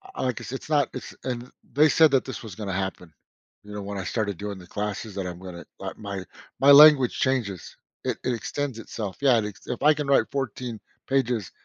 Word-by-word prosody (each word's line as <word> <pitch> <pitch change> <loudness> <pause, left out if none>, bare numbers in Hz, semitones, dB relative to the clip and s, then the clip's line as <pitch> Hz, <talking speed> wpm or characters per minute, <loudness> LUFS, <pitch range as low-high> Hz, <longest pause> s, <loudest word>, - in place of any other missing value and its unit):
I - - -2
I 125 - +2
guess 120 - -8
it's 135 +3 -6
not 145 -4 +3
it's - - -8
and 125 -1 -4 0.2
they 150 +2 +5
said 160 -1 +5
that 135 -2 +3
this 130 -4 -6
was 110 -5 -8
gonna 100 -3 -4
happen, 90 -3 -4 0.5
you 105 0 -11
know, 105 - -5
when 100 0 -5
I 95 - -3
started 100 -1 -2
doing 105 -1 -5
the 90 -2 -13
classes 105 +1 -4
that 95 -2 -3
I'm 90 0 -7
gonna 90 -2 -9
like - - -6
my 100 -3 -6 0.3
my 140 +1 +7
language 145 -3 +8
changes. 115 -9 -1 0.3
It - - -1
it 125 - 0
extends 130 +2 -3
itself. 105 -3 -6
Yeah, 130 -4 +5
if 105 +4 -6
I 150 - +7
can 150 -1 -4
write 140 - +3
14 125 -4 -4 0.3
pages 120 - 0
115 Hz, 210 wpm, -25 LUFS, 100-135 Hz, 0.5 s, language